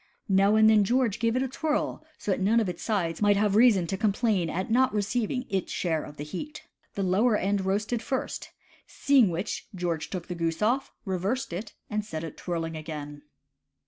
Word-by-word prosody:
Now 195 +2 +4
and 220 0 +6
then 215 -1 +6
George 240 0 +1
gave 230 0 +1
it 255 - +2
a - - -1
twirl 300 +4 -2
so 205 - -3
that 190 - 0
none 210 +5 +3
of 220 - 0
its 175 -2 -5
sides 180 -7 -1
might 205 -1 +4
have 205 -1 +2
reason 215 -6 +5
to 190 +3 -3
com 215 0 +2
plain 200 -7 +1
at 185 +6 -3
not 255 +3 +4
receiving 240 +4 -1
its 190 -2 -2
share 160 -4 -1
of 150 - -11
the 145 - -5
heat. 185 - -7 0.3
The 200 - -1
lower 210 +5 +3
end 195 0 0
roasted 210 +4 0
first; 260 +2 -3 0.4
seeing 270 -8 +3
which, 175 +3 -4
George 170 -3 -2
took 180 -3 -5
the 180 - -4
goose 165 +2 -2
off, 255 +5 +1
reversed 195 +5 -2
it, 200 +4 -6
and 210 0 -2
set 160 -6 -5
it 160 - -6
twirling 165 -2 -3
again. 150 -2 -7
200 Hz, 205 wpm, -27 LUFS, 175-230 Hz, 0.4 s, and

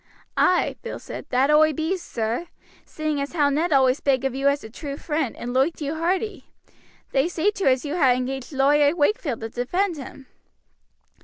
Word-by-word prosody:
"Ay," 360 - +2
Bill 470 - -6
said, - - -8
"that 265 +3 +2
oi 310 +1 +5
be, 320 +5 -1
sir, 240 -4 -3 0.4
seeing 310 -2 -3
as 280 - -4
how 295 -4 +3
Ned 320 +5 0
always 265 -2 +4
spake 270 -3 +1
of 270 -2 -1
you 270 +1 0
as 280 +1 +1
a 220 - -8
true 280 +2 -6
friend, 300 -6 -2
and 245 +1 -5
loiked 270 +6 +1
you 295 -1 -2
hearty. 365 +7 -2 0.6
They 270 +3 +2
say 350 +3 +1
too 405 -2 -4
as 260 +2 +2
you 295 +3 -3
ha' 265 -8 +4
engaged 260 +2 -4
Lawyer 285 +2 +3
Wakefield 290 - 0
to 225 - -4
defend 345 - -1
him." 270 0 -10
285 Hz, 185 wpm, -24 LUFS, 265-325 Hz, 0.6 s, oi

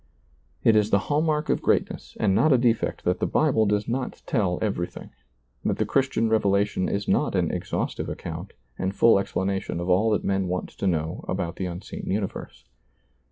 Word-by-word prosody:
It 115 - +5
is 105 -1 +3
the 100 - +4
hall 145 +9 0
mark 155 -1 0
of - - +1
greatness - - -1
and 100 -3 +2
not 155 +10 +4
a 130 - +6
defect 120 -2 +1
that - - 0
the - - 0
Bible 110 -1 +2
does 105 0 0
not 125 +2 -3
tell 95 -8 0
everything, 100 -5 -3 0.5
that - - 0
the - - +1
Christian 130 -4 +1
revelation 100 -3 +1
is 100 0 -2
not - - +1
an - - +1
exhaustive - - -3
account - - -6 0.3
and 95 +1 -2
full 115 -4 +5
explanation 95 -2 -2
of 85 +1 -3
all 100 +5 +3
that 105 - +1
men 95 -1 0
want 90 +1 -3
to 100 - -4
know 80 -3 -1
about 85 0 -3
the 95 - -2
unseen 90 +2 -7
universe. 100 0 -4
100 Hz, 185 wpm, -25 LUFS, 95-115 Hz, 0.5 s, a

